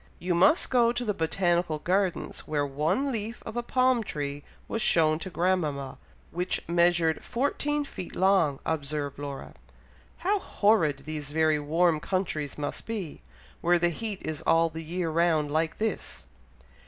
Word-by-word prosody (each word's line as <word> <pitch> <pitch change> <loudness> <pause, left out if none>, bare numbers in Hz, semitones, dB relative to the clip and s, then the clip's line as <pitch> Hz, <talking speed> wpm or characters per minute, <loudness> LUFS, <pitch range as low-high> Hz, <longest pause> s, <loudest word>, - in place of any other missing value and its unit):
"You 180 +1 -1
must 190 - +4
go 240 -2 +4
to 245 0 -3
the 210 - 0
Botanical 175 -1 0
Gardens, 185 +3 -1
where 145 -2 0
one 160 - 0
leaf 225 0 -4
of - - -7
a 240 - 0
palm 255 -1 +2
tree 145 -5 -4 0.2
was 225 - -2
shown 155 -5 +4
to 190 - -6
grandmama, 165 -7 -1 0.3
which 180 +2 -2
measured 170 -1 +2
fourteen 290 +3 -1
feet 185 -9 -8
long," 185 -7 +3
observed 145 -2 -2
Laura. 140 - -6 0.6
"How 400 +3 +1
horrid 165 - +2
these 150 -2 -5
very 155 -1 +2
warm 160 +2 +2
countries 170 -4 -2
must 145 -1 -4
be, 205 - -5 0.4
where 175 +1 +4
the 175 0 +2
heat 210 +3 -5
is 155 -2 -3
all 165 0 +4
the 160 +1 -7
year 170 +1 -2
round 160 -3 +2
like 160 +1 0
this!" 215 - -3
170 Hz, 155 wpm, -27 LUFS, 155-200 Hz, 0.6 s, must